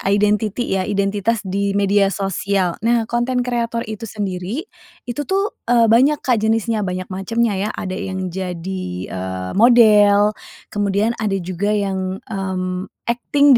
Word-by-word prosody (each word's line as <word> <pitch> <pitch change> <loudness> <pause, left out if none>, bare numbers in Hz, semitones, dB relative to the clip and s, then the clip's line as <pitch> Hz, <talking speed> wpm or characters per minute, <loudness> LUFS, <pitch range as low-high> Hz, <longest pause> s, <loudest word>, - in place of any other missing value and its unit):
identity 210 +2 +1 0.2
ya, 185 - -2
identitas 205 +2 0
di 200 +1 -1
media 200 0 +3
sosial. 195 -2 -1
Nah, 230 +1 +2
konten 240 +2 0
kreator 235 -1 -1
itu 220 +1 -6
sendiri, 200 - -4 0.4
itu 245 +4 -4
tuh, 395 +2 0 0.2
eee, 230 -2 +4
banyak 275 +6 +4
Kak 250 -4 +2
jenisnya, 220 +1 +1
banyak 185 +1 -4
macamnya 225 +5 0 0.2
ya. - - -2
Ada 185 -1 -4
yang 190 -2 -4
jadi, 185 0 -4 0.3
eee, 95 0 -4
model, 210 -3 +6 0.4
kemudian 205 +2 +1
ada 210 -3 0
juga 185 +4 -1
yang, 190 -2 -2
mmm, 185 -2 -3 0.2
akting 280 +4 +3
205 Hz, 135 wpm, -20 LUFS, 190-230 Hz, 0.4 s, model